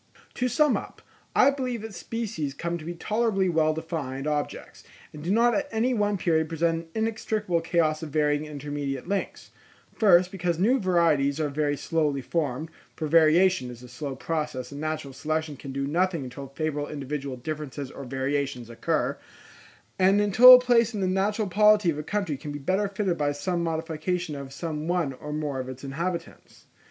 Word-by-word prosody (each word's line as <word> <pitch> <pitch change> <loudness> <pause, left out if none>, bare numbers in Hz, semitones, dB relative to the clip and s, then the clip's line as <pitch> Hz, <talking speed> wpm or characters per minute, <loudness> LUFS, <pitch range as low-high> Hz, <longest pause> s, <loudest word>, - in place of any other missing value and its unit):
To 250 - 0
sum 280 +3 +3
up, - - -9 0.3
I 275 - +6
believe 250 -5 -3
that 220 -2 -7
species 180 -6 -4
come 170 +2 -3
to 155 - -10
be 175 +1 -5
tolerably 210 0 0
well 155 -2 +2
defined 155 -5 -4
objects, 150 -1 -3 0.3
and 150 - -9
do 170 - -3
not 235 +4 +4
at 290 -1 -1
any 230 +3 +1
one 205 -3 +1
period 160 -3 +1
present 165 0 0
an 220 - +1
inextricable 215 -5 -1
chaos 165 -2 +1
of 160 - -5
varying 150 0 +1
and 150 - -9
intermediate 145 -1 -4
links: 200 +1 -3 0.4
first, 185 -4 +4
because 175 -3 -1
new 235 +9 +3
varieties 165 - +2
are 150 -2 0
very 145 0 -1
slowly 150 -3 0
formed, 155 0 -2 0.2
for 155 - -3
variation 160 -2 +4
is 120 0 -10
a - - -10
slow 135 +3 -6
process, 150 -3 -3
and 140 +1 -7
natural 155 -3 -3
selection 155 +2 -2
can 135 0 -8
do 140 +1 -2
nothing 170 +1 0
until 130 +2 -8
favourable 145 +1 -3
individual 140 -2 -4
differences 145 0 -5
or 140 - -8
variations 135 -2 -2
occur, 115 - -1 0.8
and 190 +2 +5
until 225 +5 +9
a - - +6
place 240 -2 +3
in 205 - -2
the 190 - +1
natural 200 +3 0
polity 210 -1 +4
of - - -4
the - - -2
country 185 -3 -2
can 145 +2 -7
be 145 - -4
better 190 +8 0
filled 195 -2 -1
by 145 -1 +1
some 170 +5 -2
modification 165 0 -2
of 140 -1 -7
some 155 +1 -4
one 175 -6 0
or 150 +3 -8
more 150 -3 -2
of 130 0 -5
its 130 +1 -9
inhabitants. 170 +5 -5
160 Hz, 185 wpm, -26 LUFS, 145-190 Hz, 0.8 s, until